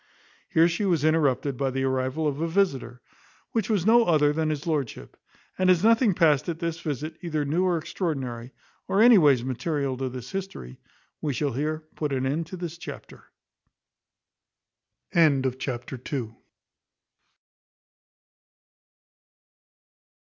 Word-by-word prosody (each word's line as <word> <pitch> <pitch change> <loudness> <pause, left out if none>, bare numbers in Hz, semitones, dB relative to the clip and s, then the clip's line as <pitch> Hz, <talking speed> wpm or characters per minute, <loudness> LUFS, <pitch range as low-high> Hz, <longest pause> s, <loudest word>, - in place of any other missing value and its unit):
Here 165 +1 +4
she 170 +4 -2
was 175 -7 +1
interrupted 145 -4 +1
by 135 0 0
the 135 +1 -2
arrival 130 +4 0
of 145 +1 -2
a 165 - 0
visitor, 150 - -1 0.5
which 225 -3 -1
was 200 -6 +1
no 230 +2 +5
other 150 -3 +3
than 160 0 0
his 150 -1 -3
lordship; 150 -7 -3 0.4
and 185 0 +3
as 180 0 +4
nothing 225 -3 +4
passed 150 -3 +3
at 165 - -3
this 165 -1 -3
visit 155 +2 -4
either 155 -4 -2
new 165 +6 +1
or 180 -2 +2
extraordinary, 130 -8 -4 0.4
or 195 - +1
any 230 -2 +8
ways 140 -7 +4
material 130 +2 -2
to 130 0 -2
this 125 -1 -8
history, 190 - -6 0.4
we 150 -2 -1
shall 145 0 -1
here 155 +4 -2
put 150 -3 -3
an 130 0 -1
end 155 +5 -1
to 185 - -8
this 170 -1 -6
chapter. - - -10 1.9
Chapter 130 -6 0
iii. 125 -7 -3
155 Hz, 135 wpm, -26 LUFS, 135-170 Hz, 1.9 s, any